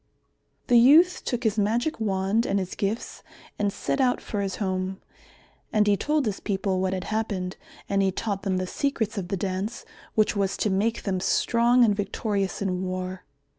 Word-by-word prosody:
The 240 -2 +5
youth 315 +9 +6
took 245 -1 -2
his 220 -1 +1
magic 235 +9 0
wand 200 +2 +1
and 200 - +1
his 185 -2 -3
gifts 210 +3 -3 0.4
and 205 -1 +1
set 270 - -1
out 250 -1 +2
for 205 - -4
his 195 -2 -2
home. 190 -1 -2 0.7
And 215 -1 +3
he 205 -1 +4
told 300 +6 0
his 210 -3 -2
people 195 -2 -1
what 190 0 0
had 185 -1 -2
happened 200 -5 -2 0.3
and 200 0 +1
he 190 -1 +2
taught 200 0 -3
them 190 -2 -1
the 185 - -1
secrets 225 -1 -1
of 180 - -5
the 195 +1 -2
Dance 195 +5 -3 0.3
which 215 -1 +2
was 195 -1 0
to 210 - 0
make 220 +4 0
them 190 -3 -1
strong 235 +5 +3
and 210 -2 +2
victorious 200 -1 -2
in 185 -2 -1
war. 185 0 -4
200 Hz, 185 wpm, -26 LUFS, 190-225 Hz, 0.7 s, youth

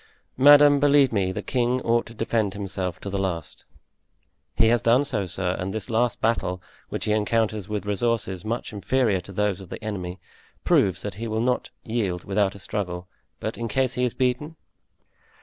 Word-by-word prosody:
"Madame, 145 +1 +8
believe 140 -3 +4
me, 95 -3 +1
the - - -4
king 125 0 +1
ought 115 0 +1
to 115 - -12
defend 110 -3 0
himself 95 -3 -4
to - - -8
the 100 0 -2
last." 90 -5 -4 0.9
"He 110 - +4
has 120 0 +3
done 125 +5 +4
so, 110 -9 -2
sir, 90 +1 -1
and 95 +1 -3
this 110 +1 -5
last 120 +1 +1
battle, 110 -5 0 0.3
which - - -3
he 110 - 0
encounters 110 -1 0
with 105 -2 -3
resources 105 -2 -1
much 115 +1 -3
inferior 105 0 +1
to 95 - -12
those 100 -1 -1
of 95 - -11
the - - -8
enemy, 95 -4 -4 0.4
proves 95 -2 +2
that 105 - -4
he 115 - -2
will 110 0 -1
not 125 +2 0
yield 100 -6 -2
without 100 0 0
a - - -8
struggle; 90 -3 -4 0.3
but 110 - -4
in 115 - -2
case 130 +3 0
he 125 - -1
is 125 - 0
beaten?" 130 +5 -1
110 Hz, 185 wpm, -25 LUFS, 95-120 Hz, 0.9 s, Madame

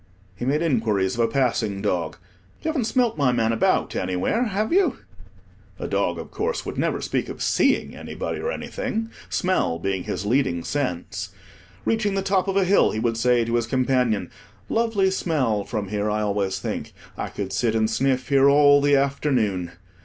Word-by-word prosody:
He 120 - -5
made 150 +5 +1
inquiries 110 - +1
of - - -6
a 115 - +4
passing 115 -6 0
dog— 90 -6 -1 0.5
"You - - 0
haven't 285 -7 0
smelt 235 - +1
my 135 -3 +3
man 115 -2 +1
about 115 - +1
anywhere, 95 - 0
have 215 - -1
you?" 385 +1 +3 0.8
(A - - -4
dog, - - 0
of - - -8
course, 465 +3 -2
would - - -5
never - - -1
speak - - -2
of - - -7
seeing - - +2
anybody - - -5
or 485 - -2
anything, 225 - -4 0.2
smell 180 - 0
being 95 +1 -2
his 100 - -3
leading 115 -7 +1
sense. 90 - -3 0.6
Reaching 215 -3 +1
the 195 - 0
top 195 0 +1
of 195 0 0
a 195 - +3
hill, 195 +2 +4
he 110 - -3
would 115 0 0
say 120 0 +2
to 115 - -3
his 120 -1 +1
companion—"Lovely 130 - 0
smell 130 - 0
from 105 -4 -4
here, 105 0 -1
I 105 0 0
always 100 -2 -1
think; - - -5 0.2
I - - -4
could 95 -1 -5
sit 115 -2 +1
and 110 -1 +2
sniff 130 +3 0
here 140 0 +5
all 145 0 +6
the 145 0 +4
afternoon." 125 - 0
125 Hz, 180 wpm, -23 LUFS, -, 0.8 s, all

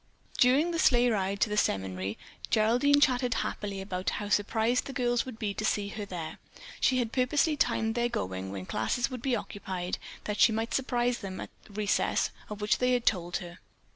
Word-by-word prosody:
During 275 +7 +4
the 335 - -1
sleigh 245 -3 +5
ride 200 -1 -1
to - - +3
the 210 - -1
seminary 95 - -1 0.3
Geraldine 245 +7 +4
chatted 250 -3 +3
happily 200 -2 -4
about 185 -1 -2
how 205 -1 -4
surprised 220 +4 +1
the 275 - -6
girls 245 0 +1
would 250 -4 -7
be 210 -3 -2
to 215 - -4
see 205 -1 0
her 210 0 -5
there. 175 -5 -6 0.4
She 255 - +3
had 235 -3 0
purposely 280 +5 +2
timed 225 -5 +1
their 240 +1 +1
going, 95 - -3
when 95 -2 -6
classes 235 - -1
would 250 -2 -5
be 260 -1 +1
occupied, 190 -4 -4 0.2
that 210 0 -3
she - - +7
might 225 +1 -2
surprise 245 -2 0
them 190 -2 -6
at - - -7
the 205 - -16
recess 210 0 +1 0.2
of 210 -1 -6
which 210 - +2
they 250 0 +3
had 245 -1 0
told 175 -3 +1
her. 175 0 -11
220 Hz, 200 wpm, -29 LUFS, 195-245 Hz, 0.4 s, she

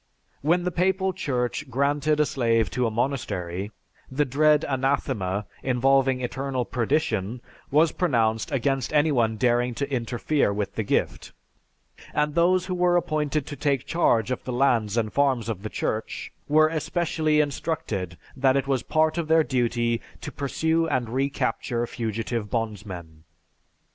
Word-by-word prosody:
When 170 +5 +2
the 180 - -1
Papal 190 +2 +1
Church 130 0 -2
granted 145 +4 +1
a 150 - +4
slave 115 -8 +1
to 125 -2 0
a - - 0
monastery, 105 -6 -2 0.4
the 145 +3 +1
dread 150 +3 +3
anathema, 130 -7 -1 0.2
involving 130 0 +2
eternal 130 0 -2
perdition, 120 -4 -1 0.3
was 155 +3 +4
pronounced 115 -8 0
against 135 -1 0
anyone 135 -8 +2
daring 120 0 +1
to 140 - -2
interfere 120 +1 0
with 100 0 -3
the - - -2
gift; 100 - -1 0.8
and 150 0 +1
those 175 +2 +3
who 185 - -3
were 175 0 +3
appointed 150 -3 -1
to 145 - -6
take 140 -2 0
charge 120 -9 +2
of 125 - -3
the 130 - -4
lands 120 -4 +2
and 110 -2 0
farms 135 -5 +2
of 110 -5 -3
the 110 - -5
Church, 110 +1 -3 0.2
were 155 +1 +5
especially 155 -1 0
instructed 145 - -2 0.2
that 135 0 +3
it 135 - 0
was 135 -3 0
part 155 +3 +1
of 165 - -2
their 160 0 +5
duty 120 -3 0 0.2
to - - -6
pursue 160 +4 0
and 130 -6 -1
recapture 125 -2 -1
fugitive 115 -1 -3
bondsmen." 100 -8 -5
130 Hz, 145 wpm, -25 LUFS, 115-150 Hz, 0.8 s, were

